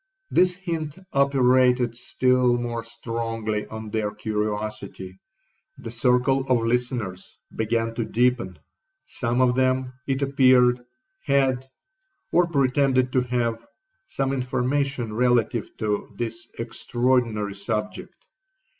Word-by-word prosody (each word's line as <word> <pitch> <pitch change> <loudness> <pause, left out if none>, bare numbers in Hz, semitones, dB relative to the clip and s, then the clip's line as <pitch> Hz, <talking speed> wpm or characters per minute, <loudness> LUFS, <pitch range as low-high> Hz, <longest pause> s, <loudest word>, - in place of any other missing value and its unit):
This 180 0 +3
hint 165 -4 -4 0.2
operated 130 -3 +3
still 125 0 +2
more 120 -1 -3
strongly 115 -2 -3
on 110 -1 -7
their 110 -1 0
curiosity—the 105 - -6
circle 125 +3 +2
of 125 -2 +3
listeners 115 -6 -2 0.2
began 115 +1 0
to 115 - -2
deepen. 120 -7 +1 0.5
Some 120 - -1
of 125 -1 +4
them, 130 0 +1
it 135 0 0
appeared, 130 -3 +4 0.4
had, 135 -2 +1 0.6
or 175 0 +4
pretended 135 -3 +2
to 130 - +3
have, 120 -2 -1 0.4
some 135 - -1
information 130 -1 -1
relative 120 -1 +1
to 105 -1 -2
this 120 +9 -5
extraordinary 115 -3 0
subject. 105 - -5
125 Hz, 100 wpm, -24 LUFS, 115-130 Hz, 0.6 s, of